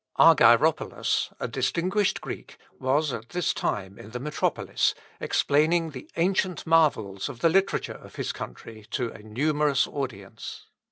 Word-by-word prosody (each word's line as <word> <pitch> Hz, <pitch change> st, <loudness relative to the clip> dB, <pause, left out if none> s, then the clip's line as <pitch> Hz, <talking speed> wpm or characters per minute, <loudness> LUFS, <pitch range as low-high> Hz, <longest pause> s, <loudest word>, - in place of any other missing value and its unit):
Argyropolos, -, -, +4 dB
a -, -, -2 dB
distinguished 190 Hz, +4 st, 0 dB
Greek, -, -, -8 dB, 0.2 s
was 140 Hz, +2 st, +1 dB
at 110 Hz, +2 st, -6 dB
this 175 Hz, -1 st, 0 dB
time 100 Hz, -1 st, -3 dB
in 105 Hz, -, -10 dB
the 125 Hz, +2 st, -5 dB
metropolis 150 Hz, +4 st, 0 dB, 0.2 s
explaining 160 Hz, +3 st, +2 dB
the 130 Hz, -3 st, -10 dB
ancient 185 Hz, 0 st, 0 dB
marvels 125 Hz, -12 st, +2 dB
of 120 Hz, -, -9 dB
the 165 Hz, -, +5 dB
literature 195 Hz, +3 st, +1 dB
of -, -, -14 dB
his -, -, -2 dB
country 110 Hz, -, -9 dB
to 120 Hz, -2 st, -2 dB
a -, -, -12 dB
numerous 145 Hz, +6 st, +1 dB
audience. 120 Hz, -9 st, -6 dB
145 Hz, 135 wpm, -26 LUFS, 110-165 Hz, 0.2 s, the